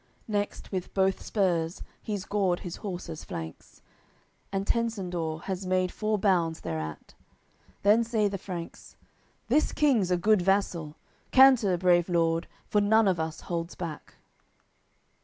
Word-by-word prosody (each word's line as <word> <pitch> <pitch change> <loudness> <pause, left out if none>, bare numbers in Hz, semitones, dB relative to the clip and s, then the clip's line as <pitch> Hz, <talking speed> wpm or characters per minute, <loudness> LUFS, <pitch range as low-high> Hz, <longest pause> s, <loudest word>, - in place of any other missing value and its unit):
Next 205 -2 -3
with 185 -2 -4
both 190 0 +2
spurs 175 -4 0 0.2
he's 205 -4 -4
gored 190 -4 0
his 175 - -6
horse's 175 -5 -6
flanks, 80 0 -8 0.7
And 195 0 -1
Tencendor 180 -9 -2
has 190 -1 -4
made 185 0 +1
four 215 0 -1
bounds 175 -5 +1
thereat. 80 -2 -5 0.7
Then 210 +3 +5
say 220 -2 +1
the 200 -1 -4
Franks: 175 -3 -8 0.5
"This 310 - +2
King's 250 -11 +2
a 180 - +2
good 210 +2 +3
vassal. 175 -5 0 0.3
Canter, 255 -8 +6
brave 175 0 +3
lord, 165 -1 +1 0.2
for 210 - +2
none 220 +1 +4
of 185 -3 +2
us 160 0 -3
holds 170 0 -4
back." 165 -4 -7
185 Hz, 135 wpm, -28 LUFS, 170-205 Hz, 0.7 s, Canter